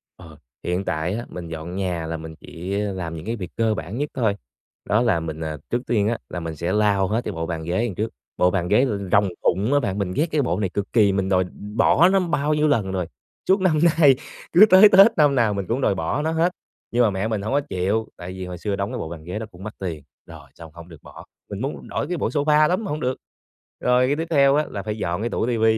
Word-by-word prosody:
Ờ, 80 -4 -14 0.3
hiện 90 +2 -2
tại 80 +4 -1
á, 120 +2 -4
mình 90 -2 -7
dọn 80 +2 -6
nhà 90 -4 -2
là 80 0 -3
mình 80 0 -9
chỉ, 95 +4 -5
ơ, 100 -2 -2
làm 85 -3 -5
những 80 - -8
cái 115 +1 -2
việc 90 -5 -7
cơ 110 -1 +2
bản 95 +5 -6
nhất 145 +1 -2
thôi, 110 -6 0 0.5
đó 105 +3 +2
là 115 -9 +2
mình, 80 -1 -6
à, 80 -1 -4
trước 120 +1 0
tiên 105 -3 +1
á, 115 0 0
là 90 - -4
mình 80 -1 -5
sẽ 85 +5 -2
lau 100 -2 +2
hết 110 +4 0
cái - - -2
bộ 80 -2 -4
bàn 80 -2 -4
ghế 85 +4 -2
đằng 100 -7 -4
trước, 110 +2 -2 0.3
bộ 90 0 +3
bàn 90 -3 -1
ghế 105 +7 +4
r 125 - -1 0.2
rồng 100 -1 +4
phụng 105 +10 +1
á 145 - +4
bạn. 100 -6 -2
Mình 95 -3 -2
ghét 155 - +2
cái 150 -2 +2
bộ 105 -6 -1
này 95 -3 0
cực 100 +1 -4
kỳ, 105 -4 +5
mình 95 0 -1
đòi 95 -1 +3 0.3
bỏ 170 +9 +5
nó 195 0 +3
bao 155 -4 0
nhiêu 150 0 +2
lần 105 -9 +1
rồi, 90 -2 -2 0.4
suốt 190 +1 +4
năm 160 -5 +2 0.2
nay, 140 -4 +7 0.4
cứ 190 +5 +9
tới 190 +3 +8
Tết 195 0 +7
năm 145 -2 +4
nào 115 -4 +2
mình 100 -2 -3
cũng 125 +4 -1
đòi 100 - +2
bỏ 95 - -1
nó 160 +1 -1
hết, 165 +2 +2 0.4
nhưng 120 +1 +3
mà 110 - +4
mẹ 95 +2 -2
mình 110 -3 -2
hổng 110 +6 -3
có 145 - +3
chịu, 100 +5 -1
tại 90 +1 -7
vì 95 0 -6
hồi 90 -1 -7
xưa 100 +3 -2
đóng 100 +4 -3
cái 125 - -4
bộ 80 - -5
bàn 80 -2 -9
ghế 90 +6 -5
đó 110 - -5
cũng 90 +2 -13
mắc 110 - -6
tiền, 85 -6 -5 0.2
rồi - - -13
xong 80 -2 -12
hổng 85 0 -12
được 80 -3 -14
bỏ, - - -12 0.2
mình 100 +2 -6
muốn 135 +3 -5
đổi - - -3
cái 180 -1 -2
bộ - - 0
sofa 150 +1 +3
lắm 185 +5 0
mà - - -5
hông 150 - -2
được. 130 +1 -1 0.6
Rồi 125 +1 +3
cái 145 - +1
tiếp 165 +1 -3
theo 140 -2 +5
á, 150 - +2
là 100 - -5
phải 105 0 -4
dọn 90 +1 -2
cái 120 - -1
tủ - - -1
TV, 115 -2 0
105 Hz, 280 wpm, -22 LUFS, 90-130 Hz, 0.6 s, cứ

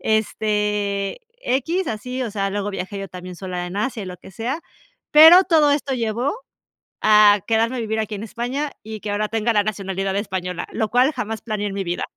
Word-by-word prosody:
este, 210 - 0 0.2
equis 325 - 0
así. 250 +4 -4
O 230 - -3
sea, 195 -2 -1
luego 205 +1 -2
viajé 195 +1 -5
yo 195 - -5
también 180 0 -9
sola 180 -1 -4
en 180 +3 -7
Asia, 220 0 -2
y - - -7
lo 180 0 -7
que 190 - -15
sea, 245 - -3 0.5
pero, 325 +5 +9
todo 305 -4 +4
esto 285 -2 0
llevó 235 - -1 0.7
a 210 -1 +7
quedarme 230 +2 +2
a - - -2
vivir 220 -1 -2
aquí 215 -1 -3
en 205 - -6
España 250 +6 -3
y 220 0 -7
que 205 - -4
ahora 210 +1 0
tenga 225 +1 0
la 205 - +4
nacionalidad 195 -2 -3
española, 185 -3 -3
lo 220 -2 -1
cual 255 +5 +3
jamás 225 -3 -4
planeé 210 -2 -2
en 195 - -5
mi 195 - -2
vida. 175 0 -3
215 Hz, 200 wpm, -21 LUFS, 200-245 Hz, 0.7 s, pero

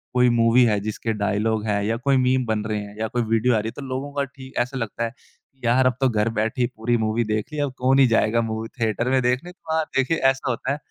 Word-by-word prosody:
कोई 125 0 +5
मूवी 120 +1 +4
है 105 -3 +2
जिसके 110 +2 -3
डायलॉग 105 +1 0
है 100 -1 0
या 115 - 0
कोई 135 +2 +2
मीम 130 0 +2
बन 110 -1 -1
रहे 110 -1 -1
हैं 100 0 -10
या 110 - -1
कोई 120 +2 -1
वीडियो 115 +2 +2
आ - - +3
रही 110 - -3
है - - -3
तो 145 - -7
लोगों 130 +2 -4
का 140 - 0
ठीक 135 -1 -11
ऐसा 125 +2 -1
लगता 115 0 -3
है 115 - -1
कि 135 - -32
यार! 125 +2 +3
अब 130 - +1
तो 130 - +4
घर 110 0 +1
बैठे 115 +4 0
ही 120 - +3
पूरी 115 +2 0
मूवी 110 +1 0
देख 110 +4 -2
ली 150 - -3
अब 145 -3 -1
कौन 130 +2 +3
ही 135 - +6
जाएगा 115 0 +2
मूवी 110 0 -3
थिएटर 115 +2 0
में 130 0 +3
देखने 125 +8 0
तो 165 -3 -7
हाँ, 160 0 +2
देखिए 135 +5 +2
ऐसा 135 -1 +1
होता 125 +2 -2
है। 140 - -1
120 Hz, 275 wpm, -23 LUFS, 110-130 Hz, -, ही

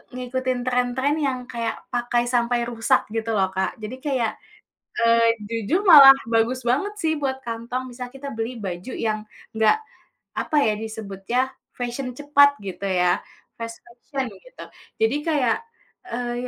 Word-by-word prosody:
ngikutin 255 0 -2
tren-tren 250 +3 +1
yang 260 -2 -1
kayak 230 -2 -3 0.2
pakai 240 0 +1
sampai 240 0 +1
rusak 225 -2 +1
gitu 225 0 -1
loh, 190 -1 +3
Kak. 190 0 0
Jadi 215 +4 -5
kayak, 255 -6 0 0.7
eee, 230 0 +4
jujur 230 - 0
malah 285 -6 +11 0.2
bagus 230 +3 +2
banget 285 +13 +1
sih, 320 -4 +1
buat 265 -2 -1
kantong. 235 +3 -4
Misalnya 250 0 -7
kita 280 +1 -7
beli 225 +2 -4
baju 185 +1 -5 0.2
yang 215 -1 -1 0.3
nggak 220 - +4 0.6
apa - - -2
ya, 220 -6 +3
disebutnya, 220 +3 -3 0.2
fashion 250 +1 -4
cepat 285 +1 +5
gitu 200 0 -6
ya, 180 -2 +2 0.4
fast 230 0 -5
fashion 250 +3 -5 0.2
gitu. - - -12 0.4
Jadi 225 +5 +3
kayak, 275 -8 +2 0.5
eee, 240 0 -2
240 Hz, 140 wpm, -23 LUFS, 225-260 Hz, 0.7 s, malah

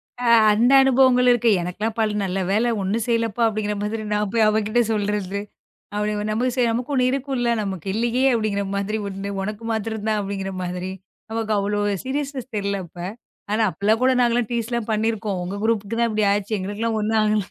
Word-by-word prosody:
அ. 245 - -5 0.3
அந்த 235 +5 +3
அனுபவங்கள் 255 -1 +4
இருக்கு. 240 -1 +3
"எனக்கெல்லாம் 210 +6 -3
பல் 215 -1 +1
நல்ல 190 0 -2
வேள 215 +4 +2 0.2
ஒண்ணும் 210 +4 -1
செய்யலப்பா!" 230 -1 0
அப்படிங்கற 210 -1 -2
மாதிரி 215 +1 -3
நான் 210 -1 0
போய் 225 -2 +4
அவகிட்ட 215 +2 +1
சொல்றது. 205 -2 -1 0.5
அப்படி 210 0 -1
அவ 210 - -2
நமக்கு 245 +3 0
செய்ய 240 -2 +2
நமக்கு 245 +5 -2
ஒண்ணு 255 -1 +3
இருக்கும்ல. 265 -3 -1
நமக்கு 190 -4 -5
இல்லியே! 235 +4 0
அப்படிங்கற 215 -3 0
மாதிரி 200 +2 -1
உண்டு 195 0 -5
உனக்கு 210 +3 -5
மாத்தரம் 220 -1 -3
தான் 215 -1 +1
அப்படிங்கற 195 -1 -4
மாதிரி. 180 +1 -4 0.4
நமக்கு 225 -1 -2
அவ்ளோ 205 +1 0 0.2
சீரியஸ்நெஸ் 270 -1 -4
தெரியல 200 -1 -1
அப்ப. 170 - -19 0.5
ஆனா 220 +1 +2
அப்பலாம் 210 +7 +1
கூட 260 +1 +4
நாங்க 240 -1 +3
எல்லாம் 240 -2 0
டீஸ்லாம் 235 -1 -2
பண்ணிருக்கோம். 215 -2 -1
உங்க 190 +3 -4
குரூப்க்குதான் 230 +1 0
இப்டி 215 -1 +1
ஆச்சு. 205 +1 -1
எங்களுக்கெல்லாம் 210 +4 -2
ஒண்ணும் 220 +1 +1
ஆகல. 215 0 +2
215 Hz, 180 wpm, -22 LUFS, 205-235 Hz, 0.5 s, அனுபவங்கள்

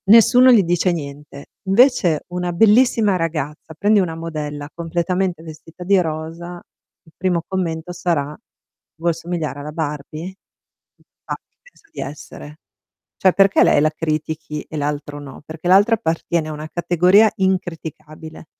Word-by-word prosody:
Nessuno 245 +4 +7
gli 225 -5 +6
dice 175 +1 +1
niente. 145 -3 -7 0.2
Invece 195 - +3
una 180 0 -3
bellissima 220 +1 +4
ragazza, 160 -1 -4
prendi 205 +2 +3
una 170 -4 -1
modella 150 -3 -5
completamente 175 +1 -2
vestita 160 +2 -11
di 190 +1 +3
rosa, 165 +2 -5 0.4
il 160 - -21
primo 180 -2 0
commento 175 -3 -3
sarà: 160 -5 -1 0.6
"Vuoi 170 +2 0
assomigliare 165 -3 -4
alla 150 +1 -6
Barbie?" 155 +3 -5 0.9
Ma - - -3
chi - - -22
pensa - - -24
di - - -7
essere? 145 +1 -9 0.6
Cioè 190 - +4
perché 195 0 +5
lei - - +4
la 155 +1 +2
critichi 155 -1 -3
e 155 - -7
l'altro 145 0 -3
no? 140 -2 -11
Perché 160 +2 -7
l'altra 200 +5 +5
appartiene 165 -5 -2
a - - -5
una 155 +1 -7
categoria 180 +6 +4
incriticabile. 165 -4 -4
165 Hz, 140 wpm, -20 LUFS, 155-185 Hz, 0.9 s, Nessuno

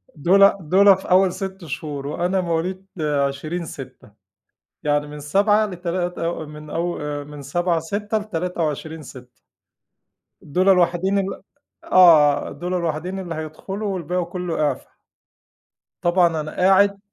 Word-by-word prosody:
دُولَة 195 +6 +5
دُولَة 190 +4 +5
في 190 - -9
أول 185 0 +4
6 190 -2 -6
شهور 145 -1 -5
وأنا 180 +5 0
مواليد 180 +2 -2
20/6. 140 -3 -3 0.7
يعني 145 0 +1
من 150 0 -9
7 205 +8 +2
لتلات 175 -1 -3
أو 165 -1 -3
من 150 0 -11
أو 170 +1 -2
آآ 145 -1 -4
من 145 0 -10
7/6، 175 +8 -1
ل23/6. 160 - -5 1.0
دُولَة 185 +6 +2
الوحيدين 180 +2 +2
ال 195 -1 -4 0.4
آه، 155 -6 +5
دُولَة 180 +5 -3
الوحيدين 170 +3 -3
اللي 175 -3 -5
هيدخلوا 190 +6 -5
والباقي 180 0 -2
كله 175 -2 -4
إعفا. 145 -3 -2 1.1
طبعًا 175 -2 +2
أنا 155 - -6
قاعد 195 +2 +4
170 Hz, 120 wpm, -22 LUFS, 150-185 Hz, 1.1 s, دُولَة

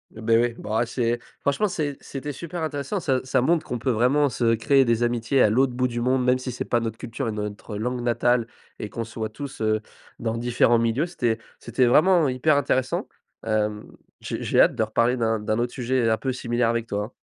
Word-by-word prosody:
Eh 110 - -9
beh, 115 +1 +3
oui, 120 0 +2
bah, 110 +3 0
c'est, 120 0 -1 0.2
franchement, 140 +10 +1
c'est 150 -6 -3
c'était 145 +2 -6
super 170 +4 -6
intéressant. 155 +5 -2
Ça 135 -6 0
ça 130 -1 +1
montre 165 +4 +2
qu'on 120 - -4
peut 130 - -2
vraiment 130 +5 +3
se 120 -2 +1
créer 135 +4 +3
des 115 0 +1
amitiés 120 +2 +1
à 105 - +5
l'autre 125 +3 +2
bout 125 +1 +1
du 120 0 -4
monde, 130 +1 +1
même 125 0 +3
si 130 0 -5
c'est 120 - -4
pas 120 - +1
notre 115 -1 -4
culture 120 +2 -4
et - - -1
notre 105 +1 -5
langue 125 +3 -2
natale 120 0 +2 0.3
et 105 - -6
qu'on 115 - -4
soit 110 -1 -5
tous, 135 +2 -8
heu, 110 0 +1 0.4
dans 115 0 -2
différents 120 0 +3
milieux. 115 +8 +1
C'était 120 -9 -1 0.2
c'était 120 +2 0
vraiment 160 +2 +5
hyper 135 +4 +2
intéressant. 130 -2 0 0.4
Hem, 105 -1 -1 0.3
j'ai - - -4
j'ai - - +3
hâte - - +4
de - - +1
reparler 125 +2 +1
d'un 110 -2 +1
d'un 110 +1 -1
autre 120 0 -1
sujet 125 -2 0
un 110 0 +2
peu 130 - -2
similaire 120 -1 0
avec 115 0 -1
toi, 105 -2 -2
hein. 120 - -12
120 Hz, 225 wpm, -24 LUFS, 115-130 Hz, 0.4 s, à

